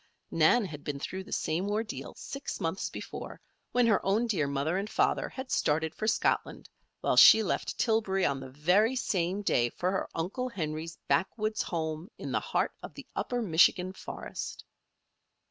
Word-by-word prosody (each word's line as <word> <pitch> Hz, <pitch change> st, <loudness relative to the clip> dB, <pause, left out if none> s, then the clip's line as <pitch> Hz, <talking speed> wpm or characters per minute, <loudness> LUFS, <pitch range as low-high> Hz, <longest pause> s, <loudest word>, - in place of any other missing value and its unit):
Nan 165 Hz, +8 st, +4 dB
had 150 Hz, -5 st, -8 dB
been 145 Hz, -1 st, -4 dB
through 190 Hz, +6 st, -5 dB
the 215 Hz, -, -13 dB
same 175 Hz, +6 st, -1 dB
ordeal 215 Hz, +1 st, -3 dB
six 275 Hz, +1 st, -6 dB
months 165 Hz, +4 st, -2 dB
before, -, -, -7 dB, 0.3 s
when 245 Hz, -1 st, +3 dB
her 220 Hz, -4 st, +3 dB
own 205 Hz, +5 st, +2 dB
dear 180 Hz, -11 st, 0 dB
mother 140 Hz, +5 st, 0 dB
and 205 Hz, +2 st, -4 dB
father -, -, +1 dB
had 260 Hz, 0 st, -7 dB
started 160 Hz, +2 st, +1 dB
for 215 Hz, -, -3 dB
Scotland, 220 Hz, -, 0 dB, 0.3 s
while -, -, +1 dB
she 220 Hz, -, +9 dB
left -, -, -2 dB
Tillbury 215 Hz, -5 st, +1 dB
on 140 Hz, -1 st, 0 dB
the 130 Hz, -1 st, -8 dB
very 180 Hz, -, +2 dB
same 190 Hz, -4 st, -1 dB
day 120 Hz, -10 st, +2 dB
for 180 Hz, +9 st, -1 dB
her 190 Hz, -, -2 dB
uncle 205 Hz, +10 st, -2 dB
Henry's 160 Hz, -5 st, -4 dB
backwoods 215 Hz, +2 st, 0 dB
home 160 Hz, +1 st, -3 dB
in -, -, -6 dB
the -, -, +1 dB
heart -, -, 0 dB
of -, -, -9 dB
the -, -, -9 dB
Upper 245 Hz, -1 st, -1 dB
Michigan 180 Hz, 0 st, +4 dB
forest. -, -, -7 dB
190 Hz, 170 wpm, -30 LUFS, 160-215 Hz, 0.3 s, she